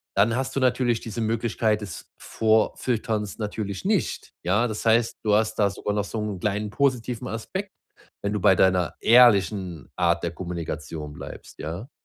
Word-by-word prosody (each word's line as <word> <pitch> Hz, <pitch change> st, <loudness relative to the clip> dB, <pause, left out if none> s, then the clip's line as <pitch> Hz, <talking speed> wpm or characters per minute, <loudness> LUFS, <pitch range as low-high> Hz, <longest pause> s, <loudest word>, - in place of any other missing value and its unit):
dann 110 Hz, +3 st, +3 dB
hast 135 Hz, 0 st, -3 dB
du 135 Hz, -, 0 dB
natürlich 125 Hz, -2 st, +2 dB
diese 115 Hz, +1 st, -6 dB
Möglichkeit 110 Hz, -1 st, 0 dB
des 100 Hz, -6 st, -8 dB
Vorfilterns 110 Hz, -1 st, 0 dB
natürlich 105 Hz, -3 st, -4 dB
nicht, -, -, -1 dB
ja? 100 Hz, +7 st, +2 dB
Das 110 Hz, -1 st, -5 dB
heißt, 115 Hz, +1 st, +3 dB
du 105 Hz, -, +3 dB
hast 110 Hz, +1 st, +1 dB
da 100 Hz, -1 st, +3 dB
sogar 105 Hz, +1 st, -3 dB
noch 105 Hz, 0 st, 0 dB
so 110 Hz, +2 st, -4 dB
'nen 105 Hz, -3 st, -3 dB
kleinen 105 Hz, +2 st, -1 dB
positiven 125 Hz, 0 st, 0 dB
Aspekt, 190 Hz, -, -5 dB, 0.5 s
wenn 100 Hz, -, 0 dB
du 105 Hz, -, -1 dB
bei 95 Hz, -, +5 dB
deiner 90 Hz, -2 st, +3 dB
ehrlichen 100 Hz, -, +4 dB
Art 85 Hz, -1 st, +2 dB
der 85 Hz, -, -1 dB
Kommunikation 80 Hz, -4 st, -5 dB
bleibst, -, -, -10 dB
ja? 85 Hz, -, -5 dB
105 Hz, 165 wpm, -25 LUFS, 95-115 Hz, 0.5 s, bei